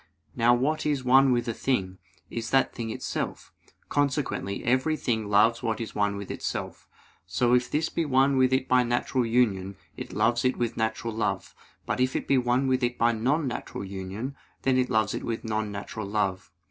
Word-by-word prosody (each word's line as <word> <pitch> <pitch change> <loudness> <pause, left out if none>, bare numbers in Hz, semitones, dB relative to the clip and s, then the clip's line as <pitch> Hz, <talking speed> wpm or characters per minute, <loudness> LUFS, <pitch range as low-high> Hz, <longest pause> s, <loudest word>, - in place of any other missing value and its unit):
Now 120 +1 +4
what 145 +6 0
is 145 -3 0
one 135 +1 +5
with 120 0 +1
a 115 - -1
thing, 95 -8 -1 0.3
is 115 -1 -4
that 135 -1 +2
thing 115 -1 -4
itself: - - -4 0.3
consequently 140 -8 -1
every 130 +6 +2
thing 110 -6 -1
loves 105 +3 +4
what 115 -1 -1
is 115 - -5
one 105 -1 0
with 100 -2 -6
itself. - - -5 0.4
So, 120 +7 +2
if 125 0 +3
this 160 +2 0
be 165 - -1
one 135 0 +3
with 130 -1 +4
it 130 0 +1
by 125 0 +4
natural 120 +1 0
union, 100 -5 +1 0.2
it - - -7
loves 115 +3 +1
it 130 0 +1
with 120 -1 -1
natural 110 0 -2
love; 110 - -2 0.3
but - - -2
if 130 0 +1
it - - -2
be 135 - +4
one 125 +2 +1
with 130 0 +1
it 120 0 0
by 120 +1 +3
non 135 +7 0
natural 120 -4 -5
union, 100 +7 -5 0.3
then 135 -1 +3
it 125 - +1
loves 110 -2 +1
it - - -4
with 115 -1 -3
non 110 -1 -2
natural 100 +1 -6
love. 100 -2 -1
120 Hz, 200 wpm, -27 LUFS, 110-130 Hz, 0.4 s, one